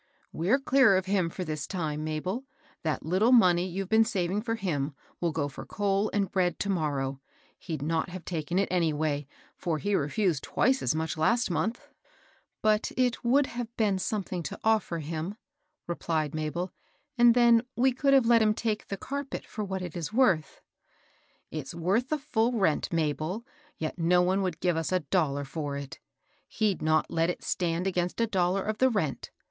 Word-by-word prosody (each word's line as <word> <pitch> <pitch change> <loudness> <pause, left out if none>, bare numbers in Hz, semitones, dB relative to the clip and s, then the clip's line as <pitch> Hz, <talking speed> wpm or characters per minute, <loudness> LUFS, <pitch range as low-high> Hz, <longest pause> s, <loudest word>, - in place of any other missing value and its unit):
*< - - -39
We're 185 +11 +2
clear 265 -7 +4
of 185 - -1
him 190 -3 +1
for 185 - -5
this 155 -3 -4
time, 155 -5 -3
Mabel 170 - -3
I 265 - -36 0.2
That 155 -2 -2
little 190 +9 +3
money 180 -7 +5
you've 190 +1 -4
been 220 +2 +5
saving 195 -2 -1
for 225 0 -2
him 150 -9 -2 0.2
will 170 -1 0
go 150 -2 -1
for 140 - -8
coal 200 0 0
and 200 -2 0
bread 180 -2 +1
to 200 - -1
morrow. 140 -6 -1 0.4
He'd 155 -5 -5
not 160 +3 0
have 180 -1 -8
taken 170 0 -2
it 200 - +2
anyhow; 155 -4 +1 0.4
for 165 -3 -2
he 205 +6 -2
refosed 165 -1 +1
twice 260 +1 +1
as - - +1
much 160 0 -2
last 230 +7 +2
month." 185 +9 -2 0.8
^^But 215 0 +2
it 250 -2 +1
would 265 +4 +4
have 240 -2 -5
been 205 -4 +2
something 185 -3 -2
to 155 - -5
offer 220 -6 +2
him," 160 +5 -4 0.5
replied 160 -3 -2
Mabel. 155 +4 -2
^^ - - -40 0.4
And 240 -1 +6
then 235 -2 +6
we 260 +2 +3
could 275 +2 +3
have 265 -3 +5
let 230 0 +5
hun 215 -1 +3
take 220 -2 -2
the 200 - -4
carpet 280 +5 -5
for 215 - -5
what 190 -2 -3
it 175 -4 -6
is 170 -1 -4
worth." 205 -10 +2 0.9
"It's 155 -1 -5
worth 195 +10 0
the 305 - +1
full 245 -4 0
rent, 190 -9 +1
Mabel; 165 +6 -1 0.3
yet 160 +3 -4
no 180 +2 +4
one 190 +2 +2
would 180 -4 -3
give 175 -2 +2
us 165 +1 -2
a 185 -1 +2
dollar 145 -3 0
for 145 0 -4
it. 140 -1 -8 0.5
He^d 215 -4 0
not 155 0 +3
have - - -5
let 165 +1 +2
it 180 - -4
stand 175 -1 -1
against 180 0 -1
a 230 - +3
dollar 190 -2 +1
of 215 0 -3
the 260 - +5
rent. 190 - -2
185 Hz, 195 wpm, -28 LUFS, 160-220 Hz, 0.9 s, And